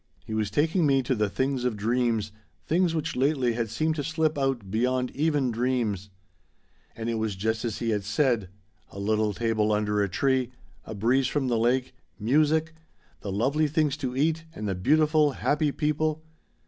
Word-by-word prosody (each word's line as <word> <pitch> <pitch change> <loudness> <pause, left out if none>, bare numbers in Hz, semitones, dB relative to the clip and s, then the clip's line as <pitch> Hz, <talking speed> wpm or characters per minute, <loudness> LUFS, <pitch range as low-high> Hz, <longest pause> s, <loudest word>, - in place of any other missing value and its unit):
He 110 - -6
was 110 -2 0
taking 160 - +2
me 135 -1 +3
to 130 - 0
the 105 -3 0
things 130 +2 -1
of 125 -4 -1
dreams, 115 -1 0 0.3
things 170 0 +1
which 160 0 -2
lately 130 -2 +1
had 115 -1 -2
seemed 155 +8 0
to 145 - -1
slip 160 +1 0
out 135 -8 -1
beyond 125 +3 0
even 145 -4 +1
dreams. 115 -5 -1 0.9
"It 115 0 -2
was 110 -2 -2
just 110 +3 -1
as 115 -3 -2
he 115 -1 -1
had 105 -2 -1
said 110 -1 +1 0.4
A - - -13
little 105 +1 +1
table 110 0 0
under 105 0 +1
a 100 - 0
tree 130 +4 +1 0.4
a 110 - -7
breeze 125 +6 +2
from 135 -2 -1
the 120 - +1
lake 125 +3 +1 0.3
music 155 +7 +2 0.5
the 100 - -5
lovely 140 +10 +1
things 150 -1 +1
to 130 -3 -4
eat 160 +3 +1
and 105 - -4
the 95 - 0
beautiful 150 - +3
happy 145 +2 +1
people. 155 +1 -1
125 Hz, 175 wpm, -26 LUFS, 110-150 Hz, 0.9 s, me